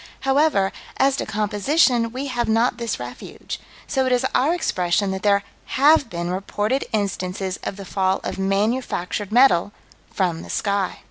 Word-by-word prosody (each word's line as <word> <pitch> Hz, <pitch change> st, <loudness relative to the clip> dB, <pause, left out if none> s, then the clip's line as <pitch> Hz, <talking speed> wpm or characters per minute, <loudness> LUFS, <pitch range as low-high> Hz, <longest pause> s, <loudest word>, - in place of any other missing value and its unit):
However, 270 Hz, -7 st, +2 dB, 0.3 s
as 270 Hz, 0 st, +3 dB
to -, -, -3 dB
composition, 230 Hz, +4 st, +2 dB
we 260 Hz, +3 st, -4 dB
have 245 Hz, -4 st, -1 dB
not 230 Hz, +2 st, +2 dB
this 235 Hz, -, -3 dB
refuge, 125 Hz, 0 st, -7 dB, 0.3 s
so 265 Hz, -1 st, 0 dB
it -, -, 0 dB
is 250 Hz, +1 st, +2 dB
our 280 Hz, +5 st, +3 dB
expression 195 Hz, -, 0 dB
that 190 Hz, 0 st, -4 dB
there 200 Hz, -1 st, +3 dB, 0.3 s
have 285 Hz, -1 st, +5 dB
been 175 Hz, -2 st, -3 dB
reported 205 Hz, +7 st, -1 dB
instances 190 Hz, -2 st, -2 dB
of -, -, -4 dB
the 200 Hz, 0 st, -9 dB
fall 190 Hz, 0 st, 0 dB
of -, -, -4 dB
manufactured 200 Hz, -1 st, -1 dB
metal 215 Hz, -6 st, +4 dB, 0.4 s
from 175 Hz, -4 st, -1 dB
the -, -, -11 dB
sky. 200 Hz, -2 st, -1 dB
205 Hz, 155 wpm, -22 LUFS, 190-255 Hz, 0.4 s, have